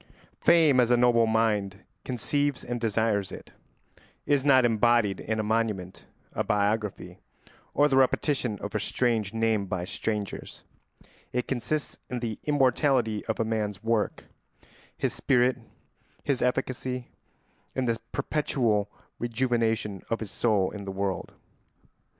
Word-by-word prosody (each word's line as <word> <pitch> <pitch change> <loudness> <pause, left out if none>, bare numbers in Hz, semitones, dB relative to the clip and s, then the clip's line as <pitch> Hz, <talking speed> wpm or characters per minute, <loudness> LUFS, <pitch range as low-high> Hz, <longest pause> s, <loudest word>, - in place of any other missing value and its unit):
] - - -36
Fame, 155 -6 +6
as 120 -1 +4
a 120 - +5
noble 120 -1 +4
mind 105 -3 0 0.2
conceives 145 +3 -1
and 120 -1 -4
desires 110 -3 +1
it, - - -10 0.7
is 145 -2 +2
not 130 -3 +5
embodied 115 -3 +3
in 110 0 -2
a - - +1
monument, 105 -4 -1 0.3
a - - 0
biography, 105 0 -1 0.6
or 145 - +5
the 135 -2 +2
repetition 130 -3 +2
of 100 - -5
a 105 - 0
strange 110 -2 0
name 110 -3 +1
by 90 -1 -2
strangers; 105 +2 -4 0.7
it 125 0 -1
consists 135 +3 -2
in 125 - -3
the 115 -3 -4
immortality 130 -5 +2
of 110 - -2
a 115 - +1
man's 105 -3 -2
work, 115 -2 0 0.7
his - - -1
spirit, 125 -1 +2 0.6
his 140 -3 0
efficacy, 125 0 -1 0.7
in 130 - 0
the 115 -1 0
perpetual 120 -8 0 0.3
rejuvenation 115 -4 0
of 115 - 0
his 105 -3 -6
soul 105 -5 +1
in 105 -1 -7
the 100 - -5
world. 95 0 -3
115 Hz, 135 wpm, -27 LUFS, 105-125 Hz, 0.7 s, Fame